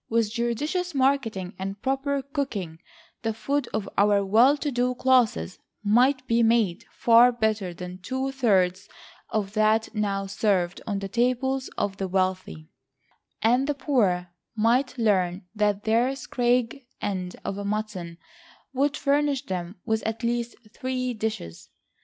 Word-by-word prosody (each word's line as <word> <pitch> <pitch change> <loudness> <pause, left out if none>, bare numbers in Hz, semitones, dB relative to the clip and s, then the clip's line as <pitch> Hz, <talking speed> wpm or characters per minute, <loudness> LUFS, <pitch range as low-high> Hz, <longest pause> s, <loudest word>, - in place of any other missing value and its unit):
With 225 -2 +1
judicious 290 +10 -2
marketing 260 -9 +1
and 195 +1 -4
proper 270 +2 -1
cooking, 230 - -4 0.4
the 225 -2 -2
food 280 +5 -1
of 215 -2 -2
our 200 -1 +4
well 235 +9 +5
to 290 0 -2
do 250 0 0
classes 250 -7 +2 0.2
might 255 +5 +3
be 235 -1 +2
made 225 -4 +2
far 235 +1 +6
better 220 -5 -1
than 180 +1 -8
two 260 +7 -3
thirds 200 -7 +1 0.4
of 205 -2 -2
that 215 +1 +2
now 200 -2 -1
served 195 -2 0
on 205 -2 -1
the 195 0 -4
tables 255 +4 0
of 200 -1 -1
the 195 - -2
wealthy; 185 - -2 0.8
and 245 +5 +3
the 290 - 0
poor 190 - +1 0.2
might 250 +4 +2
learn 190 -5 +1
that 210 -1 0
their 235 +4 +2
scrag 245 0 0 0.2
end 185 -3 -3
of 200 +1 -3
mutton 200 -5 -4 0.6
would 280 +2 +1
furnish 280 -1 +1
them 180 0 -4
with 220 0 0
at 220 +2 -4
least 235 0 -1 0.2
three 255 -1 -2
dishes. 215 - -5
225 Hz, 140 wpm, -25 LUFS, 195-255 Hz, 0.8 s, far